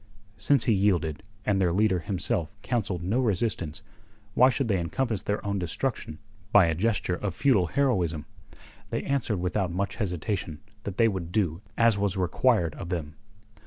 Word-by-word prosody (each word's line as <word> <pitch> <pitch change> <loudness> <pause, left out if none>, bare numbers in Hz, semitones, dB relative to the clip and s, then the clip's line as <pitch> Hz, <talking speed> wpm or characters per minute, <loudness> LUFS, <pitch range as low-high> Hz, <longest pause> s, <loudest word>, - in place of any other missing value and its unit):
Since 140 -4 +3
he 115 - +3
yielded, 90 -6 +1 0.2
and 100 -2 +2
their 90 -2 +3
leader 95 0 +2
himself 85 0 -1
counselled 100 -8 -1
no 105 +8 +1
resistance, 100 -7 -1 0.5
why 130 +4 +6
should 135 -1 -1
they 100 -4 +1
encompass 110 +5 -1
their 105 +1 -2
own 100 -1 -1
destruction 90 -2 -3 0.3
by 105 -5 +7
a 80 - +1
gesture 100 +1 0
of 95 0 -3
futile 120 -11 +3
heroism? 90 - 0 0.6
They - - -2
answered 130 -7 0
without 90 +1 -1
much 100 +3 -2
hesitation 90 -5 -3 0.3
that 95 -2 -5
they 115 - +5
would 95 -5 -3
do 90 -4 0 0.2
as 115 -3 +4
was 100 -1 0
required 90 - +2
of 85 - -7
them. 80 -4 -3
95 Hz, 160 wpm, -27 LUFS, 85-110 Hz, 0.6 s, by